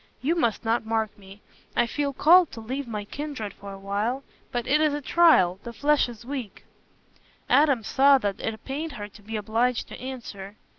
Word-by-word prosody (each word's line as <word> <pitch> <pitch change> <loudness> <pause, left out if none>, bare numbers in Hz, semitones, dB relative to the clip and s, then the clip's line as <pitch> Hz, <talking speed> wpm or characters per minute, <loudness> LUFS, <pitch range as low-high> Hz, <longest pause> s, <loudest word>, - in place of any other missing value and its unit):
You 300 +6 +1
must 235 - 0
not 225 +1 +1
mark 220 -1 -1
me. 195 +1 -15 0.3
I 240 - +3
feel 285 +4 -2
called 335 +5 +5
to 230 - -7
leave 260 +4 -4
my 210 -3 -4
kindred 285 -5 -5
for 200 0 -10
a 195 - -8
while; 205 +7 -2 0.3
but 240 -1 -2
it 300 +2 +3
is 305 -2 +2
a - - -2
trial—the 235 - +3
flesh 290 +1 +2
is 235 -1 -11
weak." 255 -6 -6 0.8
Adam 280 -6 +4
saw 275 +5 +5
that 205 -6 -2
it 220 -1 -5
pained 295 +3 -4
her 205 -4 -6
to 210 +1 -17
be 220 +2 -7
obliged 225 +3 0
to - - -9
answer. 220 -6 -7
235 Hz, 190 wpm, -26 LUFS, 210-280 Hz, 0.8 s, called